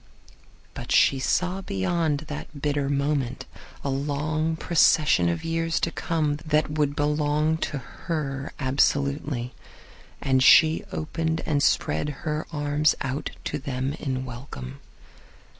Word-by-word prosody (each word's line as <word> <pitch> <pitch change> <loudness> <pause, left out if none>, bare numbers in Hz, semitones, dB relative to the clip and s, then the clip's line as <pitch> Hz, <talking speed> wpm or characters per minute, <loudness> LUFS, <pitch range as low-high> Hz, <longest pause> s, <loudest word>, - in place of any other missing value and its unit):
But - - -7
she 135 - +5
saw 180 +8 0
beyond 150 - 0
that 150 -1 -8
bitter 145 -1 0
moment 140 -3 -1 0.4
a 140 - -1
long 150 +3 -1
procession 150 - +3
of 85 - -2
years 165 0 0
to 170 - 0
come 155 -4 -1
that 155 0 0
would 150 -2 0
belong 150 +1 +1
to 150 - -3
her 135 0 -4
absolutely. 140 -1 0 0.7
And 130 -1 +2
she 155 +4 +6
opened 160 +1 -2
and 145 -2 +1
spread 80 - +1 0.2
her 150 0 -2
arms 150 0 +2
out 140 +2 -2
to 150 - -3
them 135 0 -3
in 130 -4 -3
welcome. 115 - -8
145 Hz, 125 wpm, -25 LUFS, 135-155 Hz, 0.7 s, she